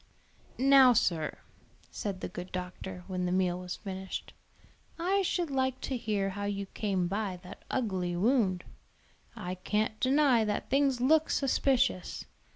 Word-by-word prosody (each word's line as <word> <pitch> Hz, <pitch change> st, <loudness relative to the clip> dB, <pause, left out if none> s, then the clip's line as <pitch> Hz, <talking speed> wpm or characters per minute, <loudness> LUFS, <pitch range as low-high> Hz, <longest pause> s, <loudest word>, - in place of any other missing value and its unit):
"Now, 265 Hz, -1 st, +7 dB
sir," 165 Hz, -8 st, 0 dB, 0.5 s
said 195 Hz, -3 st, -4 dB
the -, -, -3 dB
good 180 Hz, +1 st, -8 dB
doctor, 180 Hz, 0 st, -6 dB
when 180 Hz, -2 st, -2 dB
the -, -, -1 dB
meal 180 Hz, -1 st, +1 dB
was 180 Hz, 0 st, -5 dB
finished, 190 Hz, -2 st, -6 dB, 0.6 s
"I 375 Hz, +4 st, +1 dB
should 350 Hz, -4 st, -1 dB
like 260 Hz, -1 st, 0 dB
to 265 Hz, -, -2 dB
hear 205 Hz, -4 st, -1 dB
how 205 Hz, +1 st, -4 dB
you 200 Hz, -1 st, -2 dB
came 195 Hz, -2 st, -1 dB
by 195 Hz, -1 st, -2 dB
that 185 Hz, +2 st, -11 dB
ugly 185 Hz, -8 st, -1 dB
wound. 195 Hz, -3 st, +2 dB, 0.7 s
I 180 Hz, +1 st, -4 dB
can't 210 Hz, +4 st, -1 dB
deny 260 Hz, -3 st, +4 dB
that 210 Hz, +2 st, -2 dB
things 270 Hz, -2 st, +2 dB
look 310 Hz, +4 st, +4 dB
suspicious. 260 Hz, -8 st, +1 dB
205 Hz, 145 wpm, -30 LUFS, 185-260 Hz, 0.7 s, Now